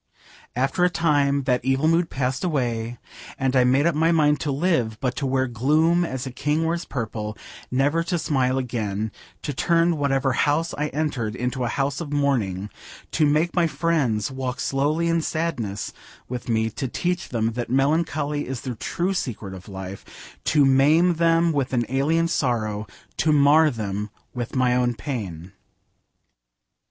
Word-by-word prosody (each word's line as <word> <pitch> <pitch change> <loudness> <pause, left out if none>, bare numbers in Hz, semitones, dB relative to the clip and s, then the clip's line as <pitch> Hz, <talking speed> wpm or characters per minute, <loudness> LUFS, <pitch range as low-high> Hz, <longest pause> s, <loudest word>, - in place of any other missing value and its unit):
After 135 +8 +1
a 180 - +5
time 145 -5 +2
that 125 -2 +1
evil 135 +3 +2
mood 165 +1 +2
passed 130 0 -2
away, 120 -8 -1 0.4
and 135 0 0
I 130 - +5
made 130 +4 +3
up 170 - +3
my 160 +2 +2
mind 150 -3 +3
to 150 - -2
live, 135 - 0
but 125 -2 -1
to 140 - -1
wear 130 0 +1
gloom 155 +8 +2
as 130 -5 -4
a 130 - -5
king 150 +5 0
wears 170 +1 -1
purple: 110 -4 -4 0.3
never 145 +6 +2
to 175 0 0
smile 135 -5 +1
again: 110 -4 -2 0.3
to 145 - -3
turn 170 +4 +2
whatever 135 -2 +1
house 150 +6 +1
I 150 +1 -1
entered 135 -8 -2
into 125 +1 -2
a - - 0
house 140 +4 -1
of 150 -4 -6
mourning: 110 -10 0 0.4
to 155 -2 +3
make 155 +4 +2
my 175 -2 +3
friends 140 -11 0
walk 130 -1 -4
slowly 150 +6 0
in 165 0 +2
sadness 155 -12 -3 0.3
with 125 -1 -6
me: 110 -1 +1
to 135 +5 -3
teach 175 +7 -2
them 115 -2 0
that 120 +1 -4
melancholy 145 +2 0
is 130 -2 -4
the 130 - -4
true 175 - -2
secret 110 - -4
of 95 +2 -10
life: 95 0 -9
to 150 -3 +4
maim 150 +7 +4
them 165 0 +3
with 135 -3 -1
an 120 -2 +1
alien 155 +6 +2
sorrow: 110 -8 -1 0.3
to 155 - +2
mar 150 +2 +5
them 105 -4 -4 0.2
with 120 0 -5
my 125 -1 +3
own 125 -1 +1
pain. 95 - -5
135 Hz, 165 wpm, -24 LUFS, 120-155 Hz, 0.4 s, a